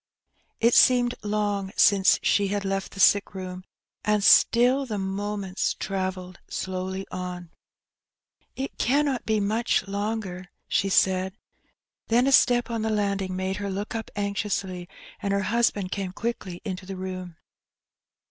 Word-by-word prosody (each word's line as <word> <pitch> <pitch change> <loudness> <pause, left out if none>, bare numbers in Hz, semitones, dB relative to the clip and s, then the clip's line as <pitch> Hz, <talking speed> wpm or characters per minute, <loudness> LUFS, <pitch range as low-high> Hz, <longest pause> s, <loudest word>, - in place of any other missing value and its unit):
It 235 +1 +4
seemed 245 -1 +5
long 205 -2 -1
since 195 -2 +5
shOt 200 -1 +2
had 200 0 -2
left 195 0 -2
the 195 - -10
sick 200 0 +4
room, 185 -1 -6 0.4
and 210 -1 +1
still 250 +6 +5
the 215 -3 -3
moments 195 0 -2
travelled 185 -2 -4
slowly 190 +1 -4
on. 180 -2 -6 1.0
"It 270 +1 -5
cannot 275 0 +1
be 220 -1 +2
much 215 0 0
longer,'^ 200 -2 -4 0.2
she 195 - +1
saidj 190 0 +2 0.7
then 240 +2 +3
a 275 - +2
step 245 -2 +4
on 230 -1 -2
the 220 - -1
landing 200 -3 -1
made 190 +1 -2
her 200 -1 -4
look 200 +2 -4
up 225 -1 -4
anxiously, 200 -3 -3 0.3
and 200 -1 -1
her 200 0 +1
husband 215 -5 0
came 195 -2 -3
quickly 205 -5 -5
into 185 -2 -5
the 195 - -5
room. 185 -2 -6
200 Hz, 140 wpm, -25 LUFS, 190-220 Hz, 1.0 s, seemed